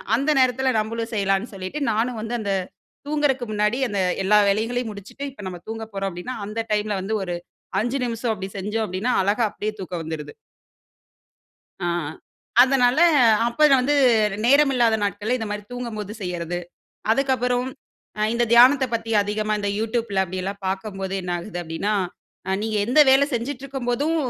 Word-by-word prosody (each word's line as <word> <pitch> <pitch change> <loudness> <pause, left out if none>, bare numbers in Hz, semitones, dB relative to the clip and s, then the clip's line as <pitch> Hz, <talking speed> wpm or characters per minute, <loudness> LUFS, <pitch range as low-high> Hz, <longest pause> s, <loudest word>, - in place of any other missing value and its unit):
அந்த 275 +6 0
நேரத்தில 260 0 +2
நம்பளும் 225 +1 -3
செய்யலான்னு 195 +2 0
சொல்லிட்டு 190 +8 -5
நானும் 225 +2 -1
வந்து 225 +2 -3
அந்த 205 -2 -2 0.6
தூங்குறக்கு 290 -4 +1
முன்னாடி 210 +3 +1
அந்த 205 - -3 0.3
எல்லா 210 +2 +5
வேலைகளையும் 225 +4 0
முடிச்சுட்டு, 210 +7 -9
இப்ப 235 - -12
நம்ம 180 -1 -7
தூங்கப் 220 0 -6
போறோம் 195 0 -2
அப்டின்னா, 180 +8 -6
அந்த 215 +2 -3
டைம்ல 210 0 0
வந்து 195 +4 -2
ஒரு 180 -2 -3 0.5
அஞ்சு 245 +5 -1
நிமிஷம் 235 -1 -1
அப்டி 190 -2 -6
செஞ்சோம் 210 +3 -2
அப்டின்னா 190 +7 -1
அழகா 205 +5 +1
அப்டியே 215 +1 -4
தூக்கம் 180 -2 -5
வந்துருது. 155 -2 -6 1.5
ஆ. - - 0 0.8
அதனால 260 +1 +3 0.5
அப்போது 300 +5 +4
வந்து, 280 +4 +2 0.5
நேரம் 280 +3 +5
இல்லாத 235 -3 +3
நாட்கள்ல 210 +4 -1
இந்தமாரி 210 -3 -4
தூங்கும்போது 230 -5 -5
செய்யறது. 175 -1 -3 0.5
அதுக்கப்புறம், 250 -1 +1 0.5
அ - - 0
இந்த 240 0 +2
தியானத்தப் 255 +1 +6
பத்திஅதிகமா 215 -1 0
இந்த 205 0 -1
YouTubeல 225 -2 -1
அப்படியெல்லாம் 190 +2 -5
பார்க்கும்போது 195 0 -3
என்ன 180 0 -3
ஆகுது 175 0 -6
அப்பிடின்னா, 170 +6 -2 0.5
"அ 190 - +1
நீங்க 220 -1 -1
எந்த 255 +6 +5
வேல 270 +2 +5
செஞ்சிட்ருக்கும் 260 +1 -4
போதும், 290 +7 0
220 Hz, 150 wpm, -23 LUFS, 195-245 Hz, 1.5 s, தியானத்தப்